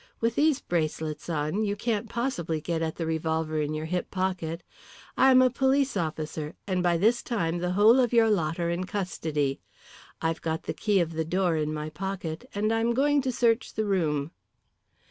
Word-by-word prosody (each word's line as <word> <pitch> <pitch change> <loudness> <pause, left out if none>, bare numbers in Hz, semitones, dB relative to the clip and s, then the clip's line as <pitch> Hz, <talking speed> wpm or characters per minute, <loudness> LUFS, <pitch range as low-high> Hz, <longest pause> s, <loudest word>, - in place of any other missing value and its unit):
"With 230 0 +1
these 295 +1 +2
bracelets 160 -1 -2
on 155 +6 -1
you 205 -1 0
can't 220 0 -2
possibly 220 -10 -2
get 165 +1 -2
at 160 -1 -2
the 165 - -3
revolver 160 -1 -1
in 150 +1 -2
your 155 +1 -3
hip 180 +2 -2
pocket. 180 -3 -2 0.5
I 265 - +5
am 255 0 +7
a 255 - +3
police 265 +1 +2
officer, 155 -3 -3
and 185 -2 0
by 175 -1 +2
this 225 +7 +3
time 175 -7 -1
the 180 +1 -1
whole 215 +6 +6
of 245 -3 +2
your 230 -2 +5
lot 165 -4 0
are 170 0 0
in 175 +2 -2
custody. 160 -8 -2 0.6
I've 165 0 -1
got 160 -1 -2
the - - -3
key 205 -3 +2
of 165 -1 -2
the 160 0 -1
door 175 +1 +1
in 155 -1 -1
my 155 0 -4
pocket, 185 +2 -5
and 215 +2 +1
I'm 230 +1 +1
going 290 +2 +3
to 260 -1 -1
search 230 -1 +1
the 215 - 0
room." 160 -7 0
180 Hz, 195 wpm, -27 LUFS, 160-225 Hz, 0.6 s, am